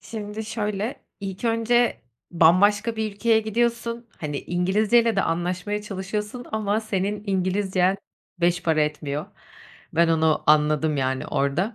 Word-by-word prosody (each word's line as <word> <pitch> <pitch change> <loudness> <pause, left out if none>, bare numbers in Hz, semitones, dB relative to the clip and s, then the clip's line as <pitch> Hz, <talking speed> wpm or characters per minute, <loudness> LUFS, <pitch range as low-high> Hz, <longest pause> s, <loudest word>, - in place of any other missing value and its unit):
Şimdi 215 0 -6
şöyle, 210 +1 -3 0.2
ilk 195 +2 -6
önce 230 +1 +2 0.3
bambaşka 205 +7 +4
bir 220 -1 -2
ülkeye 220 +2 +2
gidiyorsun, 235 +1 -1
hani, 145 -2 -3
İngilizceyle 210 +6 +2
de 195 - +3
anlaşmaya 180 +5 -2
çalışıyorsun 210 +4 -5
ama 215 0 0
senin 205 -1 -2
İngilizcen 190 0 +1 0.4
beş 175 +1 +2
para 160 -2 +2
etmiyor. 150 -1 -3 0.7
Ben 170 +1 +3
onu 160 -1 +2
anladım, 150 0 +3
yani, 130 -1 -1
orada. 165 - 0
200 Hz, 125 wpm, -24 LUFS, 170-220 Hz, 0.7 s, bambaşka